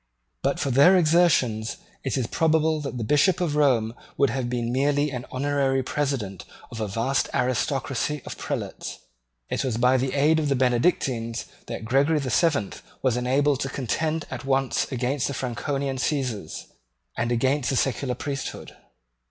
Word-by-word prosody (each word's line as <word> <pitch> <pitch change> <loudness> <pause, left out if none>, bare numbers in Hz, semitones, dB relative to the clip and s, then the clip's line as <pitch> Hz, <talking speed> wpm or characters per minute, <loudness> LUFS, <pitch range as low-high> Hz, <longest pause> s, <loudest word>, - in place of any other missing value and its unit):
But - - 0
for 135 - 0
their 145 +9 +6
exertions 155 -10 +3 0.3
it 135 - -1
is 130 - 0
probable 160 +3 +2
that 140 -3 -5
the 115 - -2
Bishop 150 - +3
of 165 -5 0
Rome 125 -7 +3 0.2
would 140 -1 +3
have 130 -2 -2
been 120 -1 -1
merely 145 +2 +2
the 125 -2 -5
honorary 135 0 +1
president 130 - -2 0.3
of 115 - -6
a 110 - -1
vast 115 +6 0
aristocracy 135 +2 -1
of - - -6
prelates. - - -5 0.5
It - - 0
was 125 -4 -1
by 125 +2 +4
the 130 +1 -1
aid 155 +3 +4
of 150 -2 0
the 140 - +2
Benedictines 120 -2 +1 0.2
that - - -5
Gregory 140 +6 +3
the 135 -4 -2
Seventh 145 - +1 0.2
was 130 -3 +2
enabled 135 +3 +2
to 135 - -2
contend 155 +5 -2
at 125 -2 -5
once 135 -1 0
against 130 +2 0
the 140 - -4
Franconian 135 +2 -2
Caesars 125 - -2 0.5
and 115 - -1
against 130 +2 +1
the 135 - 0
secular 130 0 0
priesthood. 135 +1 -5
135 Hz, 160 wpm, -25 LUFS, 125-145 Hz, 0.5 s, their